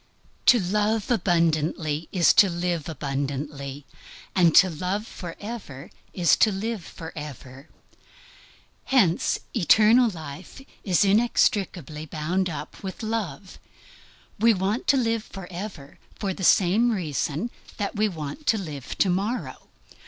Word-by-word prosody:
To 245 - +8
love 210 +4 0
abundantly 165 -5 +1
is 175 -3 +4
to 200 - +6
live 175 -2 -2
abundantly, 140 -1 -4 0.5
and 170 -3 +4
to 190 - +8
love 185 +5 -3
forever 180 - -8 0.2
is 175 -3 +3
to 220 - +4
live 210 0 -3
forever. 150 -4 -9 1.2
Hence, 205 -11 +2 0.2
eternal 225 +4 +5
life 160 - -9 0.2
is 190 0 +3
inextricably 195 - +1
bound 175 +5 -1
up 155 -1 -7
with 190 +2 -7
love. 215 -3 -4 0.8
We 225 +1 +5
want 195 +6 -2
to 280 - +5
live 230 -3 0
forever 180 -5 -8 0.2
for 195 -2 -3
the 190 - -7
same 200 +7 +4
reason 170 - -2 0.3
that 205 0 -3
we 215 0 +2
want 160 - -7
to 225 - +4
live 150 -9 -6
to 195 - +3
morrow. 205 +7 -3
185 Hz, 120 wpm, -25 LUFS, 155-210 Hz, 1.2 s, To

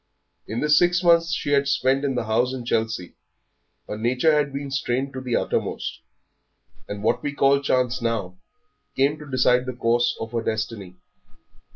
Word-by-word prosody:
In 110 +3 -3
the 150 - 0
six 175 +3 +4
months 170 -1 +4
she 145 - -2
had 140 -1 +3
spent 135 0 +1
in 135 -2 -1
the 120 - -1
house 120 +4 0
in 125 -2 -7
Chelsea 110 -6 -2 0.7
her 105 - -5
nature 125 +7 +2
had 145 -2 +1
been 140 0 -5
strained 135 0 -1
to 130 - -5
the 125 -2 -2
uttermost, - - -2 0.9
and 105 0 -6
what 110 - +1
we 145 - -2
call 140 0 +4
chance 125 -2 0
now 110 -6 -2 0.6
came 140 +3 +1
to 150 -1 -11
decide 125 -1 +2
the 130 - -3
course 120 0 +1
of 115 0 -5
her 115 -1 -1
destiny. 110 -4 -4
125 Hz, 175 wpm, -23 LUFS, 115-140 Hz, 0.9 s, six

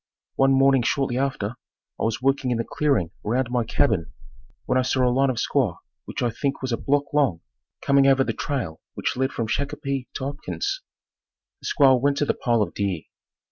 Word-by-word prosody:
One 135 0 +3
morning 135 -1 +5
shortly 130 0 0
after, 135 -7 -1 0.5
I - - 0
was 115 +2 -2
working 135 -1 +2
in 120 - +1
the 115 - 0
clearing 135 - +1
around 120 +3 0
my 125 -1 +1
cabin, 105 -5 +1 0.5
when 130 - +2
I - - +4
saw 130 0 +1
a 125 - +2
line 135 +1 +3
of 125 - -2
squaws 120 -13 +1 0.3
which - - -4
I 120 - +1
think 135 +4 -2
was 130 - -2
a 115 - +1
block 140 0 0
long, 135 - +2 0.4
coming 140 0 +4
over 135 -1 +5
the - - -2
trail 125 - -3
which - - -2
led 130 +1 0
from 115 - -2
Shakopee 140 +1 -2
to - - -4
Hopkins. 145 - -3 0.8
The - - -7
squaws 135 -4 +4
went 140 +1 +2
to 145 - +2
the - - +1
pile 120 -3 +1
of - - -6
deer. 95 -5 -1
130 Hz, 200 wpm, -24 LUFS, 115-140 Hz, 0.8 s, morning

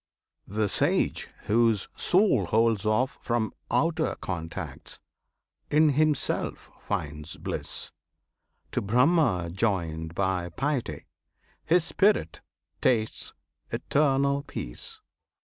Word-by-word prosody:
The 105 +1 0
sage - - +1
whose 115 -2 +2
soul 180 - +3
Holds 110 -1 +2
off 125 +5 +1
from 115 -2 -1 0.2
outer 160 0 +1
contacts, 80 -3 -6 0.7
in 155 +1 +5
himself 150 0 0
Finds 75 +1 -4
bliss; - - -4 0.8
to - - 0
Brahma 120 - +3
joined 85 -5 -1
by 95 -2 0
piety, 130 - -2 0.6
His 175 +1 +3
spirit 190 - +1 0.4
tastes 110 -3 0 0.4
eternal 140 -1 +2
peace. - - -7
115 Hz, 90 wpm, -27 LUFS, 90-145 Hz, 0.8 s, in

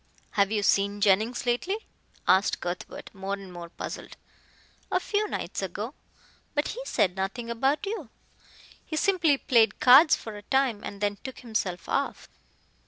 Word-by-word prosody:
"Have 200 -2 +2
you 210 -2 0
seen 200 0 +2
Jennings 215 +6 +2
lately?" 355 - -1 0.4
asked 190 +3 +4
Cuthbert, 175 +1 -6
more 195 0 -3
and 195 -2 -11
more 170 -1 -8
puzzled. - - -7 0.7
"A - - +3
few 425 0 0
nights - - -4
ago. - - -4 0.6
But 290 - +1
he - - -5
said 185 - +1
nothing 220 +5 -3
about 270 - +1
you. 395 - -4 0.7
He 315 - -5
simply 340 -4 +3
played 225 -6 +3
cards 275 +6 +8
for 220 -2 -8
a - - -9
time 255 -2 +1
and 200 0 -7
then 205 0 0
took 260 -1 -7
himself 205 -6 -3
off." 275 - -1
225 Hz, 155 wpm, -27 LUFS, 200-275 Hz, 0.7 s, cards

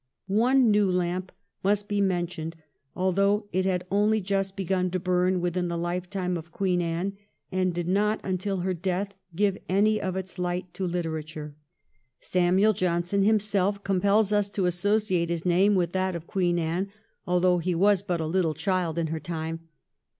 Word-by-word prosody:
One 235 +4 +3
new 205 -2 +3
lamp 180 0 -1 0.3
must 205 +1 +1
be 205 -1 0
mentioned, 175 -3 -1 0.4
although 200 +3 +2
it 185 +1 +1
had 180 -2 0
only 210 +2 +3
just 195 0 -1
begun 185 -1 0
to 185 +1 -2
burn 180 0 +1
within 175 0 -1
the 170 0 -2
hfetime 180 +1 -2
of 165 +1 -12
Queen 180 -1 0
Anne, 175 +4 -2 0.3
and 185 -1 +1
did 175 0 -3
not 210 +3 +2
until 190 +1 -1
after 180 - -3
her 190 - +1
death 185 +3 -2 0.2
give 200 +1 +1
any 210 +3 +3
of 185 -1 -2
its 190 0 -5
light 180 0 -2
to 190 - -3
hterature. 155 -3 -4 0.7
Samuel 185 +4 +3
Johnson 180 +1 0
him 215 +2 +4
self 200 -1 0
compels 200 +2 +2
us 205 -1 +2
to 200 -2 -1
associate 180 -1 +1
his 170 0 -3
name 190 +4 +4
with 175 -2 +1
that 185 0 -1
of 170 -1 -6
Queen 175 -1 0
Anne, 170 +4 -1 0.4
although 180 0 +3
he 175 +1 -1
was 200 +2 +4
but 180 -4 -2
a 160 - -1
little 165 -1 0
child 170 0 -1
in 170 - +1
her 160 0 -3
time. 165 0 -5
185 Hz, 175 wpm, -26 LUFS, 175-200 Hz, 0.7 s, him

